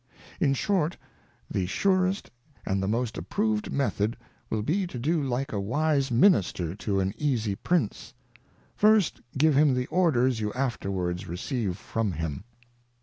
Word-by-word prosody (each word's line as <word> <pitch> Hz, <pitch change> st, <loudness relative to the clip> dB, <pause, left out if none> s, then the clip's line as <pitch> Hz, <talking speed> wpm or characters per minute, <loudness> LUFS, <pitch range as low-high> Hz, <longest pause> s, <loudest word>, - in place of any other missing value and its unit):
__In 135 Hz, -, +3 dB
short, 175 Hz, 0 st, 0 dB, 0.5 s
the 90 Hz, -2 st, -1 dB
surest 185 Hz, -, +1 dB, 0.3 s
and 95 Hz, 0 st, 0 dB
the 95 Hz, -, -1 dB
most 115 Hz, +2 st, -1 dB
approved 215 Hz, +1 st, -1 dB
method 115 Hz, -5 st, 0 dB, 0.3 s
will 110 Hz, -1 st, -1 dB
be 180 Hz, -, 0 dB
to 130 Hz, -, -7 dB
do 155 Hz, +6 st, +1 dB
like 135 Hz, -1 st, -2 dB
a 100 Hz, -, -1 dB
v/\bq 140 Hz, +5 st, +1 dB
Minister 115 Hz, -, +3 dB
to 100 Hz, 0 st, -1 dB
an 95 Hz, 0 st, 0 dB
easie 120 Hz, -8 st, 0 dB
Prince; 130 Hz, -, -1 dB, 0.6 s
first 210 Hz, -4 st, +3 dB, 0.2 s
give 155 Hz, +1 st, +4 dB
him 145 Hz, -2 st, +5 dB
the 125 Hz, 0 st, 0 dB
Orders 130 Hz, -9 st, +3 dB
you 105 Hz, -1 st, -1 dB
afterwards 95 Hz, -9 st, -2 dB
receive 95 Hz, -, -3 dB
from 110 Hz, -4 st, -2 dB
him. 80 Hz, +3 st, -4 dB
125 Hz, 145 wpm, -27 LUFS, 100-155 Hz, 0.6 s, him